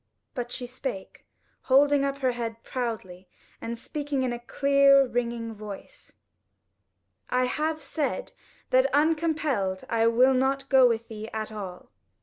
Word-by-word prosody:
But 245 -1 -4
she 245 - -4
spake, 245 -5 -7 0.4
holding 280 +1 +4
up 275 0 -1
her 255 - +4
head 230 -1 -5
proudly 190 -7 -5 0.3
and 235 +1 -4
speaking 285 +2 -3
in 250 -2 -1
a 240 - -5
clear 275 +2 +4
ringing 235 -2 -3
voice: 210 -2 -10 1.2
"I 250 0 +2
have 310 +4 -1
said 300 - -2
it, - - -32 0.4
that - - +4
uncompelled 300 - +1
I 230 0 +3
will 250 +3 +5
not 270 +1 0
go 260 -1 +7
with 230 -1 -1
thee 220 0 -7
at 220 0 -4
all." 190 - -8
250 Hz, 140 wpm, -27 LUFS, 225-275 Hz, 1.2 s, go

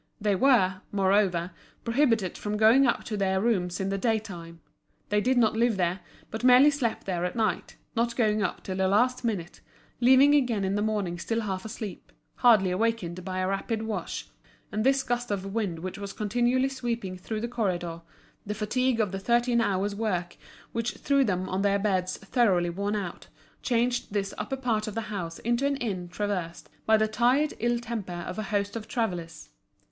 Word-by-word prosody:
They 205 -2 +1
were, 190 -5 +3
moreover, 190 -3 +2 0.3
prohibited 230 -6 +1
from 210 0 -3
going 230 +5 +6
up 240 - 0
to 220 - -4
their 190 -2 +1
rooms 185 -5 0
in 190 0 -1
the 195 0 -1
day 225 +1 +2
time; 170 -6 -9 0.5
they 210 0 +2
did 255 +3 +2
not 230 -3 +4
live 230 -2 +2
there, 180 +1 0 0.3
but 220 +2 -5
merely 255 +3 +7
slept 260 -6 -2
there 180 -3 -2
at 180 - -2
night, 215 -6 -1 0.2
not 235 0 0
going 215 -3 +2
up 190 - -2
till 185 -1 -4
the 190 0 +2
last 245 +7 +2
minute, 195 -7 -3 0.4
leaving 260 +3 +6
again 245 -8 +2
in 190 0 0
the 205 - 0
morning 205 -5 -1
still 225 +5 -1
half 190 -3 -4
asleep, 215 - -7 0.3
hardly 210 -6 +5
awakened 185 -3 -1
by 185 0 -4
a 185 0 0
rapid 215 +3 -2
wash; 220 -1 -4 0.4
and 215 0 -1
this 270 +1 +3
gust 245 -1 -2
of 195 -1 -3
wind 205 -7 -1
which 185 +4 -6
was 200 -1 -6
continually 245 +5 +1
sweeping 235 -7 -3
through 215 +4 -5
the 235 - -2
corridor, 175 -8 -2 0.4
the 210 +1 -4
fatigue 240 +3 0
of 210 -4 +1
the 195 - -3
thirteen 235 +3 +2
hours' 200 -1 0
work 190 -5 -2 0.4
which 230 +1 -2
threw 280 -1 +2
them 185 -5 -1
on 190 +1 -1
their 200 0 +3
beds 185 -3 0
thoroughly 195 -6 +1
worn 200 +4 -2
out, 190 -4 -5 0.3
changed 240 -1 0
this 200 -1 -2
upper 220 +6 -3
part 230 -4 -1
of 215 - -5
the 220 -1 -4
house 170 -4 -4
into 240 +3 -1
an 280 - 0
inn 190 -8 -3
traversed 180 -4 -4 0.2
by 220 0 +6
the 215 0 +2
tired 245 +7 +2
ill 240 +1 +1
temper 215 -7 -5
of 180 +3 -5
a - - -2
host 200 -1 -1
of 225 -2 -5
travellers. 175 - -3
210 Hz, 190 wpm, -27 LUFS, 190-235 Hz, 0.5 s, merely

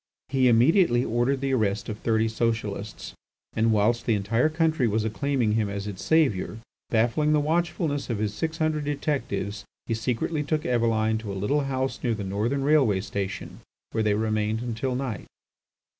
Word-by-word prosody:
He 130 -1 +3
immediately 125 - +4
ordered 120 +4 0
the 135 -1 0
arrest 105 -4 0
of 105 -1 -5
thirty 110 -1 +1
Socialists, 110 -2 -3 0.4
and 115 0 +2
whilst 110 +2 +2
the 115 - +3
entire 115 +8 +1
country 160 -5 +1
was 110 0 0
acclaiming 120 +1 0
him 105 -1 +1
as 100 0 -4
its 100 -2 -6
saviour, 135 - +2 0.3
baffling 120 +7 +2
the 150 - +4
watchfulness 160 -2 -1
of 115 - -1
his 105 0 -1
six 160 +8 -3
hundred 155 -2 0
detectives, 125 -8 -2 0.2
he - - -1
secretly 125 +7 -1
took 150 +1 -1
Eveline 110 -2 +1
to 110 -2 -6
a - - -4
little 140 +9 0
house 130 0 -2
near 120 -3 +1
the 105 - -5
Northern 110 +8 -1
railway 135 -9 +3
station, 100 0 -5 0.3
where 110 - 0
they 105 -1 +2
remained 110 +1 0
until 125 +2 -2
night. 125 -5 -4
115 Hz, 170 wpm, -26 LUFS, 105-140 Hz, 0.4 s, immediately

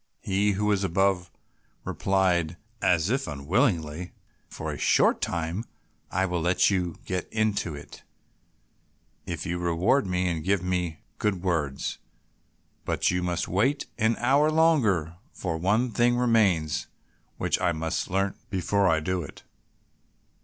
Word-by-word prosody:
He 100 +1 +1
who 105 +2 -1
was 100 -2 +2
above 95 0 +1 0.6
replied 90 -4 +1 0.2
as 90 0 +2
if 135 +1 0
unwillingly, 80 - 0 0.4
"For - - -5
a - - -5
short - - +3
time 85 +5 -2 0.5
I 95 - +1
will 90 -2 -1
let 90 +4 +3
you 90 -4 -1
get 90 -1 -3
into 105 -7 0
it, 70 - -11 1.3
if 85 0 -4
you 90 -1 -2
reward 90 +8 +2
me 90 0 0
and 85 -3 -2
give 95 +1 +1
me 90 -4 -2 0.2
good 95 -4 0
words; 80 -7 -1 0.8
but - - +1
you 90 0 0
must 90 -1 -1
wait 130 +10 +1
an 110 +1 +3
hour 140 +5 +3
longer, 115 - +2 0.2
for 85 -4 -3
one 110 +8 +1
thing 120 +1 +2
remains 105 -11 +2 0.5
which - - 0
I - - +3
must 80 +3 -2
learn 95 +1 0 0.2
before 100 0 +1
I 80 -2 +3
do 90 +2 -1
it." 75 - -10
90 Hz, 140 wpm, -27 LUFS, 85-105 Hz, 1.3 s, short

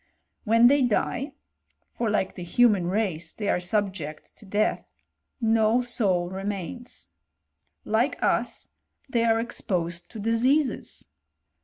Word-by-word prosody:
When 230 +2 +5
they 280 +3 +6
die 265 +4 0 0.6
(for 235 -2 -2
like 205 -2 0
the - - -9
human 195 0 +3
race 180 -5 -1
they 205 -2 -3
are - - +2
subject 180 -5 -3
to 210 - -15
death), 205 +2 -1 0.4
no, 225 0 +3
soul 195 -8 +1
remains. 200 +5 -5 0.8
Like 230 +6 +1
us - - 0 0.4
they 235 -3 +1
are 225 -1 +3
exposed 175 -7 -3
to 225 - -9
diseases! 250 +7 +1
215 Hz, 120 wpm, -26 LUFS, 185-235 Hz, 0.8 s, they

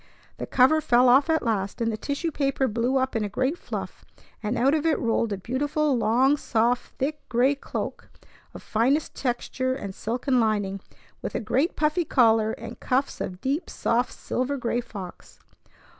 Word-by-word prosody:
The - - -5
cover 270 +5 +4
fell 250 -4 +4
off 270 +5 +5
at 320 0 +2
last, 205 -3 -1
and 230 -1 0
the - - -2
tissue 285 +8 -3
paper 275 -2 0
blew 240 +4 0
up 260 -1 0
in 225 - +1
a 205 - -2
great 260 - 0
fluff; - - -7 0.4
and 220 +3 -2
out 265 +4 +3
of 310 -2 +1
it 325 -2 +2
rolled 230 -1 0
a 200 - -1
beautiful 285 +7 0
long, 250 +5 +3
soft, 240 -1 0
thick 295 +3 -2
gray 250 +4 +3
cloak 280 - -6 0.5
of - - -9
finest 260 +8 +1
texture 255 0 -2
and 200 -7 -6
silken 250 +5 0
lining, 205 -3 0 0.4
with - - -5
a - - +1
great 265 - 0
puffy 305 +3 +1
collar 225 -6 +3
and 230 - -9
cuffs 260 +2 -1
of 180 -1 -5
deep, 280 +6 -1
soft 245 +2 0
silver 260 +3 -2
gray 240 -1 -1
fox. 195 -6 -10
250 Hz, 175 wpm, -25 LUFS, 225-280 Hz, 0.5 s, off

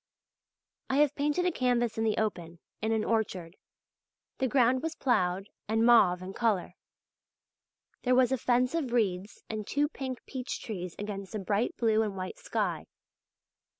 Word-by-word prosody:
I 265 - +1
have 295 -1 +4
painted 295 +5 0
a 360 - +3
canvas 245 -5 +1
in 225 - -1
the 220 -1 +1
open, 175 -6 -2 0.2
in 220 - 0
an 220 -1 +1
orchard. 190 -6 -1 0.8
The 265 - +2
ground 255 0 +3
was 325 +1 -3
ploughed 195 -6 0 0.2
and 225 +2 +2
mauve 185 -7 +5
in 190 +1 -7
colour, 205 -7 0 1.3
there 250 0 +3
was 255 0 +4
a 265 - +2
fence 250 +3 +2
of 290 -8 -1
reeds 200 -4 -1
and 215 -2 -5
two 290 +1 +1
pink 260 -4 -6
peach 260 0 -5
trees 180 -6 -6
against 200 -1 -6
a - - -1
bright 205 +4 -1
blue 220 -2 +3
and 205 -3 -2
white 185 0 -5
sky. - - -2
225 Hz, 160 wpm, -30 LUFS, 195-255 Hz, 1.3 s, mauve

